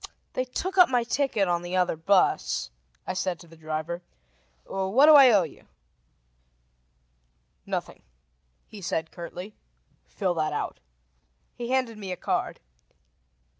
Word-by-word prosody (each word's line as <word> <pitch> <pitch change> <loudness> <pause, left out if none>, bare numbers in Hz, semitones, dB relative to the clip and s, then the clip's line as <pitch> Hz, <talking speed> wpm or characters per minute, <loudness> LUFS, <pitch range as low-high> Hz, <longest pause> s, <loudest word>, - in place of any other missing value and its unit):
"They 255 - -1
took 375 +9 -3
up 360 - +8
my 245 -2 +2
ticket 240 -5 0
on 175 -1 +1
the 175 +1 -3
other 180 -2 +2
bus," 180 - +1 0.3
I - - -3
said 185 -1 -2
to 170 - -14
the 165 - -16
driver. 155 +2 -4 0.6
"What 195 +8 +3
do 310 - +8
I 275 -3 +9
owe 205 -5 +5
you?" 160 - -11 2.0
"Nothing," - - -4 0.6
he 210 - -12
said 160 -2 -2
curtly. 180 +4 -8 0.5
"Fill 190 -4 -1
that 155 -2 -1
out." - - -3 0.7
He 240 -1 -6
handed 255 -4 0
me 195 -3 -6
a 180 - -4
card. - - -2
190 Hz, 135 wpm, -26 LUFS, 170-245 Hz, 2.0 s, I